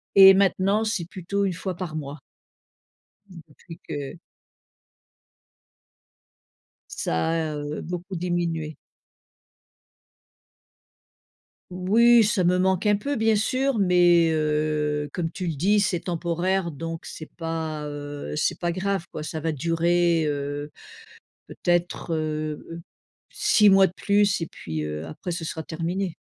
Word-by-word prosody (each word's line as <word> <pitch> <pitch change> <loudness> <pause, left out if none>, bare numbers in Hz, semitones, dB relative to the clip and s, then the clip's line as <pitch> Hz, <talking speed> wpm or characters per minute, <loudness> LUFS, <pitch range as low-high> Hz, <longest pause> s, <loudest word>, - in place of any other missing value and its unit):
et 195 0 +10
maintenant 195 +2 +2
c'est 215 -6 -2
plutôt 190 +3 -2
une 190 - -1
fois 185 +1 -4
par 170 -4 -5
mois 145 -1 -6 1.1
depuis 165 -1 -13
que 145 +3 -5 2.8
Ça 80 - -1
a, 160 -2 -1
heu, 145 +1 -5
beaucoup 180 +2 -6
diminué. 170 -3 -2 3.0
Oui 225 +6 +5
ça 200 -2 +1
me 180 +1 +3
manque 190 +1 +1
un 210 -1 +4
peu 285 +7 -3
bien 220 -2 +2
sûr 255 +3 0
mais, 175 -3 +4
heu, 150 -1 0
comme 165 -2 -2
tu 185 -1 -5
le 165 - -2
dis 200 +8 +3
c'est 185 -4 0
temporaire, 175 +1 -1
donc 165 +1 -6
c'est 155 - -9
pas, 160 -2 -4
heu, 145 0 -6
c'est 150 - 0
pas 175 -1 -1
grave, 190 -1 -2
quoi. 155 - -6
Ça 160 +1 -5
va 160 +1 -2
durer, 170 +2 +1
heu, 145 0 -3 0.8
peut-être, 175 -1 -1
heu 155 -1 -3
heu, 165 - -7 0.5
6 210 -1 +4
mois 195 -1 +7
de - - -14
plus 205 -1 +2
et 165 - -2
puis, 80 - -6
heu, 75 +1 -5
après 80 - -6
ce 165 -1 -4
sera 160 0 -4
terminé. 170 +3 -3
170 Hz, 130 wpm, -24 LUFS, 155-190 Hz, 3.0 s, et